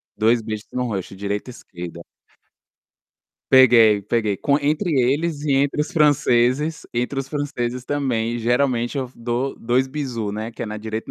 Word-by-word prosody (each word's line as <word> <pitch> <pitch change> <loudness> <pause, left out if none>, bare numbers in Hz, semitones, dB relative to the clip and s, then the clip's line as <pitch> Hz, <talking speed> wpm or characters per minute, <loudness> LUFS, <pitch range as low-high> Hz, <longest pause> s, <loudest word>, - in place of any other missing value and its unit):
2 115 +2 +3
beijos 110 -1 -6
no 125 - -2
rosto 95 -4 -4
direita 100 +4 -3
e - - -6
esquerda. 85 -6 -9 1.5
Peguei, 115 -5 +7
peguei, 105 -1 0
com 140 +7 +1
entre 155 +5 0
eles 145 +4 +1
e 150 - -1
entre 140 +2 +1
os 150 - -2
franceses 145 0 +2
entre 125 +3 -1
os 135 - -3
franceses 125 -4 -3
também, 120 -5 -1
geralmente 120 +1 +1
eu 130 -2 -3
dou 120 +3 -2
2 125 +3 +1
bisous, 125 -7 -3
né, 110 +2 -5
que - - -7
é - - -3
na 105 0 -5
direita 110 +1 -5
120 Hz, 160 wpm, -22 LUFS, 110-140 Hz, 1.5 s, Peguei